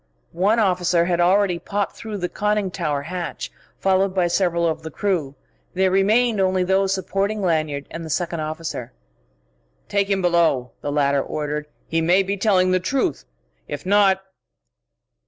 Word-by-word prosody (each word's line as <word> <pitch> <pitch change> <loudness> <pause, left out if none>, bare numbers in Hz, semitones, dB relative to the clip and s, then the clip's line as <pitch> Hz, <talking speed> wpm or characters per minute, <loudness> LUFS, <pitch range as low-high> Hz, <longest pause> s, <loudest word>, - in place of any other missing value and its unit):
One 195 +6 +2
officer 180 -4 +2
had 175 -1 +1
already 185 0 +3
popped 200 +3 -3
through 215 -2 -6
the 180 -2 -2
conning 210 0 -1
tower 145 -4 -2
hatch, 175 0 -5 0.3
followed 190 0 +1
by 180 -2 +3
several 170 -2 +1
of 160 0 -2
the 160 - -6
crew. 160 -6 -2 0.4
There 190 0 +2
remained 215 +4 +3
only 185 -1 +2
those 190 +1 +2
supporting 195 +2 -1
Lanyard, 155 -5 0
and 165 - -6
the 160 - -7
second 170 +1 -1
officer. 155 -5 -5 1.0
"Take 200 0 +1
him 195 -1 +1
below!" 165 -8 +2
the 145 - -3
latter 140 -1 +2
ordered. 150 +1 -4 0.2
"He 165 0 0
may 180 +4 +4
be 195 +1 -2
telling 185 -2 +2
the 185 - +3
truth. 185 - -1 0.4
If - - -6
not...." 195 -1 +3
180 Hz, 155 wpm, -22 LUFS, 160-195 Hz, 1.0 s, may